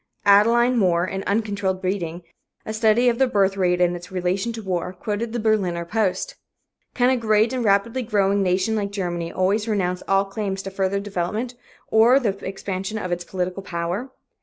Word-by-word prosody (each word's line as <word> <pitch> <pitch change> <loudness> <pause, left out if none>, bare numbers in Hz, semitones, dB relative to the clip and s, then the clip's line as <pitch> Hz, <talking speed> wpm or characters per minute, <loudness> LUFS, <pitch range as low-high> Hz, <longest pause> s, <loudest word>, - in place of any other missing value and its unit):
Adelyne 235 +5 +5
More, 175 -3 +2
in 190 +1 -4
"Uncontrolled 200 -3 -1
Breeding," 180 -3 -3 0.4
a 215 - -4
study 220 +2 +3
of 235 -1 +2
the 265 - +4
birth 195 -4 +2
rate 180 -2 +1
in 175 0 +2
its 175 +2 -10
relation 190 +4 -1
to 225 -1 -7
war, 180 -1 -2
quoted 215 +4 -3
the 240 - -2
Berliner 195 -6 0
Post: 215 - -1 0.6
"Can 250 0 +3
a - - +3
great 220 +1 +2
and 255 -2 -1
rapidly 215 +4 +2
growing 200 -3 +1
nation 190 +4 +1
like 205 -2 -1
Germany 175 -4 -3
always 200 +4 0
renounce 180 -4 -1
all 195 0 +3
claims 195 -1 -4
to 195 - -6
further 195 0 0
development 205 +5 -3 0.4
or 230 +4 +6
to 240 -7 +1
the 195 - -9
expansion 195 +2 -4
of 185 -4 -4
its 175 0 -2
political 185 +1 -3
power? 175 +7 -3
200 Hz, 185 wpm, -23 LUFS, 185-220 Hz, 0.6 s, or